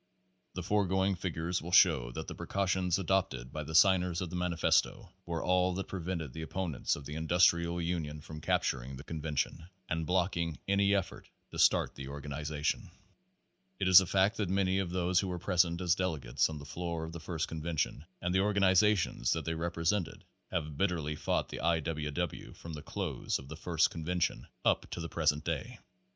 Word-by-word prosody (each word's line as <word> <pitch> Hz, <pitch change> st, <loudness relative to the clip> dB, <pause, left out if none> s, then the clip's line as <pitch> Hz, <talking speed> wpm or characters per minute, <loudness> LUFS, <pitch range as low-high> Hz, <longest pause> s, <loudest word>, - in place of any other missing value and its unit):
The 90 Hz, -, -3 dB
foregoing 95 Hz, 0 st, +2 dB
figures 85 Hz, -1 st, -2 dB
will 85 Hz, -, -7 dB
show -, -, +5 dB
that -, -, -5 dB
the -, -, -5 dB
precau 100 Hz, 0 st, -2 dB
tions 95 Hz, -1 st, +1 dB
adopted 85 Hz, -10 st, -1 dB
by 75 Hz, -, -3 dB
the 80 Hz, +2 st, -6 dB
signers 90 Hz, -2 st, +5 dB
of 90 Hz, -3 st, -4 dB
the -, -, -4 dB
Manifesto 90 Hz, -2 st, +1 dB, 0.2 s
were 85 Hz, -1 st, -2 dB
all 90 Hz, 0 st, +2 dB
that 95 Hz, -, -4 dB
prevented 85 Hz, -6 st, -4 dB
the 80 Hz, -, -6 dB
opponents 80 Hz, -3 st, -2 dB
of 70 Hz, -, -9 dB
the 75 Hz, -, -6 dB
industrial 85 Hz, +1 st, +3 dB
union 85 Hz, -3 st, -2 dB
from 75 Hz, 0 st, -9 dB
capturing 65 Hz, -2 st, 0 dB
the 65 Hz, -, -9 dB
convention 80 Hz, +1 st, -3 dB, 0.2 s
and 80 Hz, -1 st, -2 dB
blocking 85 Hz, -3 st, 0 dB
any 100 Hz, 0 st, +3 dB
effort 95 Hz, -, -3 dB, 0.2 s
to -, -, -6 dB
start -, -, +4 dB
the 70 Hz, -1 st, -8 dB
organization. 75 Hz, +1 st, -3 dB, 0.9 s
It 95 Hz, -, 0 dB
is 95 Hz, 0 st, +10 dB
a 95 Hz, -, -3 dB
fact 95 Hz, +3 st, +2 dB
that 105 Hz, -4 st, -1 dB
many 95 Hz, 0 st, +2 dB
of 95 Hz, -3 st, -1 dB
those 90 Hz, 0 st, +1 dB
who 95 Hz, -, -1 dB
were 90 Hz, -1 st, -3 dB
present 85 Hz, -1 st, +2 dB
as 90 Hz, -1 st, +3 dB
delegates 80 Hz, -11 st, 0 dB
on 80 Hz, -, -5 dB
the 70 Hz, -, -9 dB
floor 85 Hz, 0 st, -4 dB
of 80 Hz, -, -6 dB
the 85 Hz, -, -7 dB
first 80 Hz, -1 st, -3 dB
convention 80 Hz, -2 st, -2 dB, 0.2 s
and 90 Hz, +1 st, 0 dB
the 95 Hz, -, +3 dB
organizations 100 Hz, -, +3 dB
that 80 Hz, -2 st, -3 dB
they 80 Hz, -, -1 dB
represented 85 Hz, +2 st, -1 dB, 0.3 s
have 75 Hz, -3 st, -3 dB
bitterly 85 Hz, -6 st, 0 dB
fought -, -, -1 dB
the -, -, -6 dB
I. 85 Hz, 0 st, +2 dB
W. 75 Hz, -1 st, -3 dB
W. 85 Hz, +2 st, -4 dB
from 85 Hz, -, -9 dB
the 75 Hz, -, -6 dB
close -, -, -3 dB
of 65 Hz, 0 st, -11 dB
the 80 Hz, -, -6 dB
first 80 Hz, 0 st, +1 dB
convention 85 Hz, +1 st, -2 dB, 0.2 s
up -, -, +2 dB
to -, -, -5 dB
the 85 Hz, -1 st, -4 dB
present 75 Hz, -2 st, +1 dB
day. 80 Hz, -4 st, -3 dB
85 Hz, 190 wpm, -32 LUFS, 80-90 Hz, 0.9 s, is